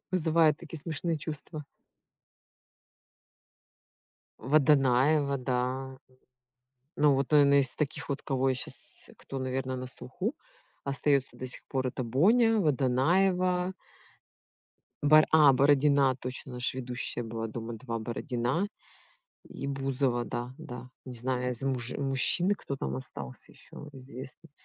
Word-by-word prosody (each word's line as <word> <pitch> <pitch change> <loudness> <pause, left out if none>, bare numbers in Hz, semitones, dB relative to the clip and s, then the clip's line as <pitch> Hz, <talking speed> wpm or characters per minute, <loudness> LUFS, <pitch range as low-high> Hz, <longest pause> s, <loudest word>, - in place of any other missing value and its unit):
Вызывает 160 -3 +3
такие 165 -2 -8
смешные 165 +1 -2
чувства. 150 0 -7 2.8
Водонаева, 140 +1 +3
да. 130 +1 -2 1.0
Ну, 145 -1 +4
вот, 135 0 -1
наверное 140 -2 +6
из 135 -2 +2
таких 150 -3 -3
вот, 140 -1 -3
кого 135 -1 0
я - - +1
щас, 125 - -4
кто 135 - -7
наверное 130 0 -2
на 130 0 -5
слуху, 130 - -4 0.5
остается 140 0 0
до 130 - -6
сих 125 - -2
пор 130 -1 -1
это 130 0 -3
Боня, 220 - +4
Водонаева 180 +6 +2 1.3
бар 155 +1 +7
а, 150 -3 +7
Бородина. 140 0 +4
Точно! 130 +1 -5
Она 125 - -6
ж 125 - +2
ведущая 125 -1 -1
была 115 0 -4
"Дома 115 +1 -6
2", 115 0 -5
Бородина 120 - -2 0.8
и 140 - -6
Бузова. 135 -3 0
Да, 120 +2 -5
да. 125 -6 -9 0.2
Не 130 - -7
знаю, 125 +1 -2
из 125 +1 -3
муж 125 -3 -2
мужчин 140 +7 +2
кто 140 - -6
там 65 - -4
остался 65 0 -7
ещё 150 - -11
известных. 130 +4 -11
135 Hz, 125 wpm, -29 LUFS, 125-150 Hz, 2.8 s, бар